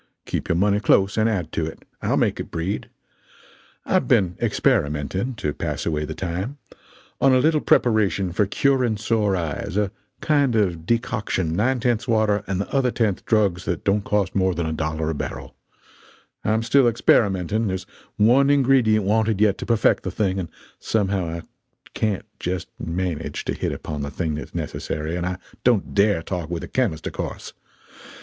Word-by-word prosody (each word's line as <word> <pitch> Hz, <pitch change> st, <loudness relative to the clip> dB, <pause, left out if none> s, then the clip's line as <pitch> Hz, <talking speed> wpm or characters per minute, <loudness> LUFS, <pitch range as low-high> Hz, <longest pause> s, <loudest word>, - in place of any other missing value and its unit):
Keep -, -, -3 dB
your -, -, +2 dB
money 100 Hz, +3 st, +2 dB
close 100 Hz, -2 st, +3 dB
and 110 Hz, +1 st, +2 dB
add 90 Hz, -7 st, -2 dB
to 80 Hz, -, -1 dB
it. 80 Hz, -, -10 dB, 0.2 s
I'll -, -, +1 dB
make -, -, +1 dB
it -, -, -5 dB
breed. 90 Hz, +5 st, -3 dB, 1.0 s
I've -, -, +1 dB
been 90 Hz, -3 st, +3 dB
experimenting 75 Hz, -, 0 dB
(to 75 Hz, -9 st, -2 dB
pass -, -, -3 dB
away 75 Hz, -2 st, -1 dB
the -, -, -6 dB
time), 95 Hz, +10 st, -4 dB, 0.6 s
on 135 Hz, -1 st, +5 dB
a -, -, +5 dB
little 155 Hz, +3 st, +3 dB
preparation 100 Hz, -6 st, +2 dB
for 100 Hz, +3 st, +1 dB
curing 125 Hz, -1 st, +2 dB
sore 105 Hz, -2 st, +1 dB
eyes 85 Hz, +1 st, -3 dB
a 105 Hz, -2 st, +1 dB, 0.3 s
kind 140 Hz, -5 st, +2 dB
of 90 Hz, -6 st, 0 dB
decoction 105 Hz, -8 st, 0 dB
nine 125 Hz, +7 st, +1 dB
tenths 120 Hz, 0 st, 0 dB
water 110 Hz, -3 st, +2 dB
and 95 Hz, -1 st, -1 dB
the 100 Hz, -, -4 dB
other 135 Hz, -2 st, +3 dB
tenth 110 Hz, -5 st, 0 dB
drugs 100 Hz, -5 st, +2 dB
that 85 Hz, -, -2 dB
don't 100 Hz, +1 st, +1 dB
cost 100 Hz, -2 st, 0 dB
more 95 Hz, -2 st, +1 dB
than 85 Hz, 0 st, -1 dB
a 80 Hz, -, -2 dB
dollar 80 Hz, 0 st, -2 dB
a -, -, -2 dB
barrel; 75 Hz, -, -6 dB, 0.9 s
I'm 110 Hz, +2 st, +1 dB
still 125 Hz, +2 st, +4 dB
experimenting; 105 Hz, -2 st, +2 dB
there's 95 Hz, -1 st, -3 dB, 0.3 s
one 125 Hz, +6 st, +5 dB
ingredient 130 Hz, -7 st, +4 dB
wanted 110 Hz, 0 st, +2 dB
yet 105 Hz, -2 st, +3 dB
to -, -, -6 dB
perfect 115 Hz, -2 st, +3 dB
the -, -, -4 dB
thing, 95 Hz, -2 st, -1 dB
and 85 Hz, -3 st, -4 dB, 0.3 s
somehow 100 Hz, -4 st, 0 dB
I 85 Hz, +1 st, -4 dB, 0.5 s
can't 105 Hz, -4 st, -1 dB
just 90 Hz, -1 st, -3 dB
manage 85 Hz, -1 st, -3 dB
to -, -, -1 dB
hit -, -, -2 dB
upon 75 Hz, -2 st, -5 dB
the 70 Hz, -, -3 dB
thing 80 Hz, +2 st, -2 dB
that's 75 Hz, -3 st, -7 dB
necessary, 75 Hz, +2 st, -3 dB
and 90 Hz, 0 st, -2 dB
I 90 Hz, 0 st, -3 dB, 0.3 s
don't 120 Hz, -6 st, +2 dB
dare 100 Hz, -4 st, +3 dB
talk 90 Hz, -4 st, -4 dB
with 85 Hz, -1 st, -3 dB
a -, -, -6 dB
chemist, 110 Hz, -12 st, -1 dB
of -, -, -4 dB
course. -, -, -5 dB
100 Hz, 180 wpm, -23 LUFS, 85-110 Hz, 1.0 s, on